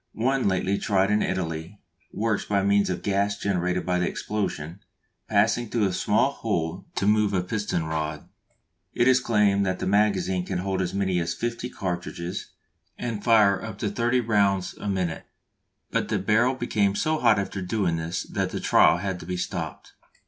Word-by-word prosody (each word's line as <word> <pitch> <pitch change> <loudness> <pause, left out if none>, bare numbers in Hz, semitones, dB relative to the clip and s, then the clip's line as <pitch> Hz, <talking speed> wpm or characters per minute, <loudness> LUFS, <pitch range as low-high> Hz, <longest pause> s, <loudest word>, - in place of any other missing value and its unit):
One 130 +2 +1
lately 95 +1 0
tried 100 -1 +2
in 105 - +3
Italy 85 +1 -3 0.3
works 110 -1 -1
by 100 -1 +1
means 100 0 +3
of 90 - -3
gas 100 0 0
generated 90 -2 -1
by 90 -1 +1
the 90 - +1
explosion 95 -5 -3 0.5
passing 110 +2 +2
through 115 -2 +1
a 95 - 0
small - - +2
hole 80 +3 -3
to 95 - 0
move 105 -1 +3
a 90 -2 +1
piston 100 -3 -2
rod. 75 -1 -3 0.7
It 120 - +3
is 130 -1 +6
claimed 105 -4 +2
that 95 0 0
the - - -4
magazine 95 -2 +2
can 90 - -3
hold 95 +1 -1
as 90 +1 -2
many 95 -2 +1
as 85 - -2
fifty 120 +1 -3
cartridges 90 -3 -4 0.5
and 115 -4 -4
fire 105 -4 +4
up 110 -3 -6
to 105 -1 -2
thirty 120 +3 +1
rounds 100 -4 +1
a 105 - -5
minute; 90 -4 -2 0.6
but - - 0
the 110 - 0
barrel 110 +7 +2
became 105 -5 0
so 155 +4 0
hot 115 -3 +4
after 100 0 -3
doing 90 -3 0
this 80 +2 -3
that - - -2
the - - -4
trial - - +5
had 95 0 -3
to 80 - -10
be 90 0 -2
stopped. - - -5
100 Hz, 180 wpm, -25 LUFS, 90-105 Hz, 0.7 s, is